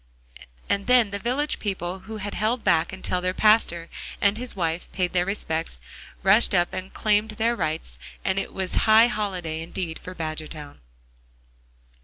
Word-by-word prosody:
And 200 +1 0
then 245 -4 +5
the 200 - -3
village 265 +7 -1
people 190 -2 -3
who 220 - -5
had 205 -1 -5
held 225 +3 0
back 160 -1 +2
until 185 -1 -2
their 185 +1 -1
pastor 210 -6 +3 0.3
and 200 0 +3
his 245 +1 -4
wife 165 -2 -2
paid 180 -1 -1
their 180 0 +1
respects, 165 -5 0 0.4
rushed 195 +2 +5
up 175 -1 +2
and 185 +1 -5
claimed 215 0 +2
their 235 +1 +2
rights, 160 -5 -3 0.3
and 190 0 +2
it - - -4
was 190 -1 -3 0.2
high 220 +1 +8
holiday 185 -9 -2
indeed 165 0 -5
for 185 - -9
Badgertown. 155 - -6
190 Hz, 160 wpm, -25 LUFS, 170-215 Hz, 0.4 s, high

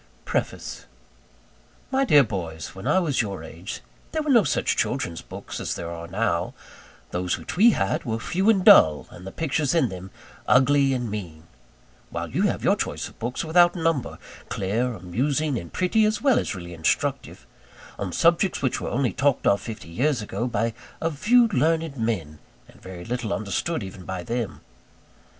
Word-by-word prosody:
PREFACE - - -3 1.0
My 270 0 +2
dear 145 - +6
boys, 85 - -5
When 95 - -7
I - - +3
was 155 -9 +2
your 100 -6 -5
age, 85 +4 -7 0.3
there 315 -1 0
were 300 - 0
no 235 -5 +6
such 145 - 0
children's 85 -1 -1
books - - -8
as - - -3
there 85 0 -5
are 85 0 -7
now. 95 -1 -1 0.6
Those 90 0 -1
which - - -7
we 215 +6 +7
had 95 - 0
were 110 -1 -2
few 190 - 0
and 195 -4 +3
dull, 80 - +7
and 90 +2 -11
the - - -6
pictures 150 - 0
in 135 -8 +3
them 95 0 -8 0.4
ugly 135 +1 +4
and 120 -4 -3
mean: 85 -7 -6 0.7
while - - -5
you - - 0
have - - -2
your - - +4
choice - - -3
of - - -21
books 120 +7 -3
without 175 +2 +5
number, 165 -6 -1 0.3
clear, 115 +6 -1
amusing, 135 - -1
and 85 - -10
pretty, 185 +4 +2
as 215 0 +1
well 265 +1 +4
as - - -3
really 85 -1 -8
instructive, 80 -1 -1 0.5
on 100 -3 -3
subjects 170 - +2
which 130 - 0
were - - -3
only 130 0 0
talked 140 -1 +1
of 100 - +3
fifty 110 -7 -8
years 130 - +1
ago 115 +3 -3
by 115 -1 -1 0.3
a 165 - -1
few 230 - +4
learned 165 -5 +1
men, 110 - -2 0.3
and - - -19
very 90 -2 -9
little 120 -3 -3
understood 110 - -2
even 95 -1 -9
by 95 -1 -5
them. 115 +1 -3
120 Hz, 175 wpm, -24 LUFS, -, 1.0 s, we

